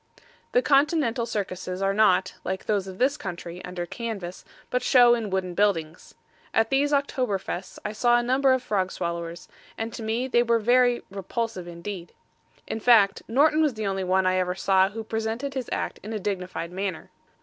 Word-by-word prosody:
The -, -, +4 dB
Continental 275 Hz, -5 st, +2 dB
Circuses 185 Hz, -4 st, -4 dB
are 195 Hz, 0 st, +1 dB
not, 195 Hz, -3 st, +3 dB
like 190 Hz, +1 st, -4 dB
those 200 Hz, -3 st, 0 dB
of 185 Hz, -1 st, -8 dB
this 275 Hz, +6 st, +2 dB
country, 175 Hz, -, -7 dB
under 180 Hz, -1 st, -5 dB
canvas, 200 Hz, -4 st, -6 dB, 0.3 s
but 250 Hz, -, +1 dB
show 245 Hz, -2 st, +6 dB
in 230 Hz, -3 st, -1 dB
wooden 190 Hz, -2 st, -2 dB
buildings. 170 Hz, -5 st, -1 dB, 0.4 s
At 225 Hz, 0 st, +2 dB
these 280 Hz, +2 st, +2 dB
October 260 Hz, -7 st, +1 dB
Fests 185 Hz, 0 st, -6 dB
I 210 Hz, -, -1 dB
saw 240 Hz, +3 st, +3 dB
a 240 Hz, -, +1 dB
number 260 Hz, +2 st, +3 dB
of 260 Hz, -1 st, +2 dB
frog 190 Hz, -5 st, 0 dB
swallowers, 170 Hz, 0 st, -4 dB, 0.3 s
and 225 Hz, +1 st, -4 dB
to -, -, -6 dB
me 225 Hz, +4 st, -1 dB
they 240 Hz, -2 st, +3 dB
were 235 Hz, -1 st, +3 dB
very 245 Hz, +2 st, +3 dB
repulsive 200 Hz, -1 st, -4 dB
indeed. 175 Hz, +1 st, -7 dB, 0.5 s
In 220 Hz, -, -4 dB
fact, 215 Hz, -4 st, +5 dB
Norton 305 Hz, +6 st, +4 dB
was 300 Hz, -6 st, +2 dB
the 215 Hz, -1 st, -3 dB
only 195 Hz, -1 st, -1 dB
one 185 Hz, +1 st, +2 dB
I 185 Hz, 0 st, +2 dB
ever 180 Hz, 0 st, 0 dB
saw 190 Hz, 0 st, +3 dB
who 225 Hz, +2 st, -6 dB
presented 225 Hz, +5 st, -3 dB
his 260 Hz, -3 st, -4 dB
act -, -, -3 dB
in 215 Hz, +2 st, -6 dB
a 215 Hz, -, -2 dB
dignified 180 Hz, -3 st, -4 dB
manner. 190 Hz, -2 st, -4 dB
210 Hz, 185 wpm, -25 LUFS, 185-240 Hz, 0.5 s, show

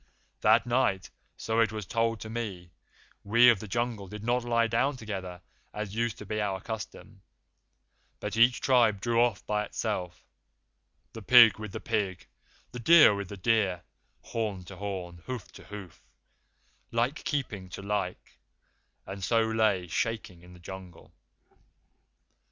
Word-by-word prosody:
That 110 Hz, +3 st, +4 dB
night, 120 Hz, -7 st, 0 dB, 0.3 s
so 110 Hz, +1 st, -1 dB
it 115 Hz, -2 st, +3 dB
was 110 Hz, -2 st, -5 dB
told 115 Hz, +2 st, 0 dB
to 110 Hz, -, -7 dB
me, 100 Hz, -7 st, -5 dB, 0.5 s
we 120 Hz, +4 st, +6 dB
of 115 Hz, -5 st, +4 dB
the 110 Hz, -, -8 dB
Jungle 115 Hz, -1 st, -2 dB
did 105 Hz, +2 st, -9 dB
not 120 Hz, +1 st, +1 dB
lie 115 Hz, -1 st, +2 dB
down 130 Hz, +5 st, 0 dB
together 95 Hz, -6 st, -6 dB, 0.3 s
as 105 Hz, -2 st, -4 dB
used 115 Hz, -1 st, -1 dB
to 105 Hz, -, -9 dB
be 105 Hz, +2 st, -2 dB
our 95 Hz, -2 st, -1 dB
custom, 105 Hz, -2 st, -8 dB, 1.0 s
but 105 Hz, -1 st, -4 dB
each 120 Hz, +2 st, +4 dB
tribe 120 Hz, -6 st, +3 dB
drew 115 Hz, +2 st, +1 dB
off 120 Hz, -4 st, +1 dB
by 105 Hz, 0 st, 0 dB
itself 95 Hz, -6 st, -4 dB, 0.9 s
the 115 Hz, -, -8 dB
pig 115 Hz, -1 st, +7 dB
with 110 Hz, -2 st, -6 dB
the -, -, -5 dB
pig, 100 Hz, -5 st, -2 dB, 0.5 s
the 125 Hz, -, -7 dB
deer 155 Hz, 0 st, +7 dB
with 100 Hz, -2 st, -5 dB
the 100 Hz, -, -7 dB
deer; 95 Hz, -3 st, +1 dB, 0.4 s
horn 105 Hz, -5 st, -3 dB
to 90 Hz, +2 st, -11 dB
horn, 95 Hz, -3 st, -5 dB
hoof 125 Hz, -6 st, -6 dB
to -, -, -14 dB
hoof, 100 Hz, -4 st, -10 dB, 0.9 s
like 120 Hz, +6 st, -1 dB
keeping 110 Hz, -10 st, -3 dB
to 100 Hz, -, -8 dB
like, 100 Hz, -3 st, -4 dB, 0.7 s
and 95 Hz, 0 st, -7 dB
so 115 Hz, +4 st, +3 dB
lay 110 Hz, -4 st, +1 dB
shaking 95 Hz, 0 st, -3 dB
in 90 Hz, +1 st, -15 dB
the 90 Hz, -, -15 dB
Jungle. 90 Hz, -1 st, -11 dB
105 Hz, 150 wpm, -29 LUFS, 95-115 Hz, 1.0 s, pig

